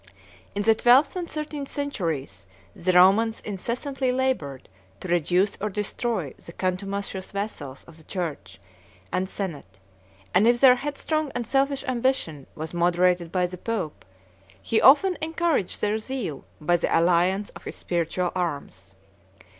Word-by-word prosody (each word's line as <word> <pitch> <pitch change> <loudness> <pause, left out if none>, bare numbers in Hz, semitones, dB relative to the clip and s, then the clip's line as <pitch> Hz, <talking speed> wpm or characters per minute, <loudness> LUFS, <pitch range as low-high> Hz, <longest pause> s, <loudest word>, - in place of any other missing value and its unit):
In 205 - 0
the 225 - +6
twelfth 250 +7 +5
and 355 -2 -4
thirteenth 300 -2 -5
centuries 160 - -3 0.3
the 185 +2 0
Romans 195 +5 +5
incessantly 250 +6 -2
labored 250 - -1 0.3
to - - -7
reduce 180 +3 +2
or 215 - 0
destroy 210 - -2
the 170 - -10
contumacious 190 +1 -3
vassals 180 -10 -5
of 165 - -12
the 160 - -15
church 145 - -5 0.5
and 185 +1 -1
senate; 145 - -6 0.6
and 200 +5 +5
if 240 0 +4
their 255 -1 +7
headstrong 295 +2 -2
and 245 -1 -2
selfish 275 +3 +1
ambition 245 - -1
was 160 +2 -6
moderated 175 0 +2
by 180 -1 +2
the 180 0 -6
pope, 200 -9 -3 0.6
he 220 - +1
often 345 +7 +6
encouraged 320 - 0
their 210 +1 +1
zeal 220 - -5
by 175 +3 +2
the - - +1
alliance 180 +4 +2
of - - -13
his - - -5
spiritual 175 +1 -1
arms. 140 - -4
195 Hz, 140 wpm, -25 LUFS, 170-250 Hz, 0.6 s, their